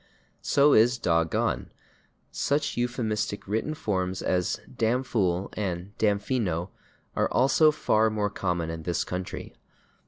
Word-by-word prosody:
So 145 Hz, +1 st, +4 dB
is 120 Hz, +3 st, +5 dB
/dog 85 Hz, -7 st, +1 dB
gone/. -, -, -1 dB, 0.6 s
Such 145 Hz, +1 st, 0 dB
euphemistic 110 Hz, -4 st, -2 dB
written 110 Hz, +10 st, -1 dB
forms 95 Hz, -6 st, -2 dB
as 90 Hz, -1 st, 0 dB
/damphool/ 110 Hz, -6 st, 0 dB
and 95 Hz, -1 st, -4 dB
/damfino/ 100 Hz, -4 st, 0 dB, 0.5 s
are -, -, +1 dB
also 140 Hz, +4 st, +5 dB
far 110 Hz, -7 st, +2 dB
more 105 Hz, -2 st, -1 dB
common 90 Hz, -5 st, -2 dB
in 80 Hz, 0 st, -6 dB
this 85 Hz, +2 st, -1 dB
country. 90 Hz, 0 st, -5 dB
105 Hz, 120 wpm, -27 LUFS, 90-120 Hz, 0.6 s, is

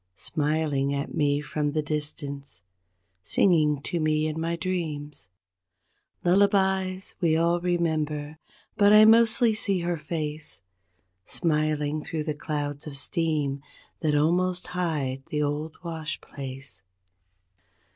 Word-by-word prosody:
Smiling 145 Hz, -, 0 dB
at 140 Hz, +1 st, -3 dB
me 145 Hz, -1 st, +1 dB
from 150 Hz, 0 st, -2 dB
the 155 Hz, -1 st, 0 dB
distance, 145 Hz, -, -5 dB, 0.6 s
singing 150 Hz, -, +3 dB
to 175 Hz, -, -2 dB
me 155 Hz, 0 st, +1 dB
in 155 Hz, 0 st, -2 dB
my 165 Hz, +1 st, -1 dB
dreams 155 Hz, -, -4 dB, 0.9 s
Lullabies 190 Hz, 0 st, +2 dB
we 160 Hz, -2 st, +3 dB
all 170 Hz, +1 st, +2 dB
remember; 155 Hz, -4 st, -1 dB, 0.4 s
but 205 Hz, -1 st, +6 dB
I 215 Hz, 0 st, +9 dB
mostly 230 Hz, +1 st, +5 dB
see 200 Hz, -4 st, 0 dB
her 170 Hz, 0 st, -1 dB
face 155 Hz, -, -5 dB, 0.6 s
Smiling 155 Hz, -2 st, 0 dB
through 155 Hz, -2 st, -3 dB
the 155 Hz, -1 st, -2 dB
clouds 145 Hz, -1 st, -4 dB
of 140 Hz, -2 st, -5 dB
steam 145 Hz, -2 st, -1 dB, 0.4 s
that 150 Hz, -2 st, +1 dB
almost 180 Hz, +4 st, +1 dB
hide 160 Hz, -7 st, -2 dB
the 150 Hz, 0 st, 0 dB
old 150 Hz, +2 st, -3 dB
wash 160 Hz, -3 st, -4 dB
place. 135 Hz, 0 st, -9 dB
155 Hz, 115 wpm, -26 LUFS, 145-175 Hz, 0.9 s, I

